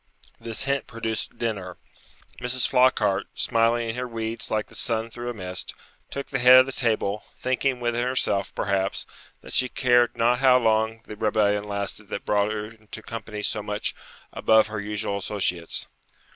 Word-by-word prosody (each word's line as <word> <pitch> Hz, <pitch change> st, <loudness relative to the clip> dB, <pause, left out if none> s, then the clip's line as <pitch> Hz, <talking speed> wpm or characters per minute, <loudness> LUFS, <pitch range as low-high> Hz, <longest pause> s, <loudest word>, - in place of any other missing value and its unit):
This 115 Hz, +1 st, -4 dB
hint 140 Hz, 0 st, -1 dB
produced 115 Hz, -1 st, -4 dB
dinner. 100 Hz, -6 st, -3 dB, 0.6 s
Mrs. 125 Hz, 0 st, 0 dB
Flockhart, 105 Hz, -6 st, +3 dB
smiling 115 Hz, 0 st, +2 dB
in 115 Hz, -, -3 dB
her 125 Hz, 0 st, -2 dB
weeds 115 Hz, -1 st, -4 dB
like 110 Hz, -1 st, 0 dB
the -, -, -18 dB
sun 115 Hz, 0 st, -1 dB
through 120 Hz, +1 st, -5 dB
a -, -, -3 dB
mist, 90 Hz, -3 st, -4 dB, 0.3 s
took 140 Hz, -, -4 dB
the -, -, -1 dB
head 125 Hz, +1 st, +9 dB
of -, -, 0 dB
the 135 Hz, -, -5 dB
table, 110 Hz, -4 st, 0 dB
thinking 130 Hz, 0 st, 0 dB
within 120 Hz, 0 st, 0 dB
herself, 125 Hz, -6 st, 0 dB
perhaps, 100 Hz, -1 st, 0 dB, 0.4 s
that -, -, -10 dB
she 125 Hz, -, +2 dB
cared 120 Hz, -2 st, +3 dB
not 120 Hz, +2 st, +3 dB
how 130 Hz, -1 st, +6 dB
long 110 Hz, -1 st, +1 dB
the 105 Hz, -, -8 dB
rebellion 105 Hz, -1 st, +1 dB
lasted 100 Hz, 0 st, -4 dB
that 100 Hz, -, -5 dB
brought 105 Hz, 0 st, +2 dB
her 105 Hz, -1 st, -3 dB
into 110 Hz, 0 st, -11 dB
company 105 Hz, -2 st, -6 dB
so 105 Hz, -, 0 dB
much 105 Hz, 0 st, -3 dB, 0.4 s
above 110 Hz, 0 st, +4 dB
her 110 Hz, -1 st, -4 dB
usual 105 Hz, 0 st, -2 dB
associates. 90 Hz, -4 st, -2 dB
110 Hz, 170 wpm, -25 LUFS, 105-120 Hz, 0.6 s, head